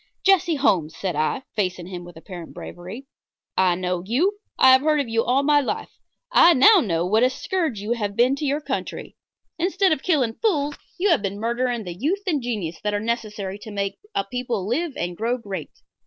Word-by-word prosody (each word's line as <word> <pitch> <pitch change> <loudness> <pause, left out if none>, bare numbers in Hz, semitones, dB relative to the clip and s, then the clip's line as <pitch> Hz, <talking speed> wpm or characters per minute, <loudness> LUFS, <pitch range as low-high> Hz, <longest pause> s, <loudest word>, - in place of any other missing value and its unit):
"Jesse 365 -4 +4
Holmes," 170 - +1
said 185 -4 -2
I, 155 - 0
facing 185 -4 -1
him 180 -1 -7
with 175 -1 -12
apparent 175 0 -9
bravery, 185 +10 -8 0.5
"I 185 -2 +3
know 180 -1 -2
you. 335 - +1 0.2
I 260 - +7
have 260 0 +6
heard 305 0 +2
of 280 - -1
you 230 0 +1
all 260 +3 +2
my 295 0 +5
life. 270 - -3 0.4
I 350 -8 +7
know 385 +10 +7
now 175 - 0
what 215 +5 +2
a 250 - +5
scourge 310 - -2
you 210 +3 -4
have 205 -4 -1
been 250 +4 +3
to 300 - -3
your 285 +2 0
country. - - -5 0.4
Instead 375 +2 +2
of 310 - +1
killing 275 -10 +1
fools 295 -10 +1 0.2
you 380 +2 +2
have 315 - +3
been 200 0 -3
murdering 235 +1 -1
the 175 -3 -6
youth 315 - -1
and 315 -7 0
genius 205 -9 -4
that 210 0 -1
are - - 0
necessary 210 -3 -3
to 220 - -10
make 200 -1 -3 0.2
a - - +1
people 235 -2 -3
live 300 +6 -1
and 175 0 -3
grow 235 +6 -1
great. 195 -8 -6
235 Hz, 205 wpm, -23 LUFS, 190-290 Hz, 0.5 s, I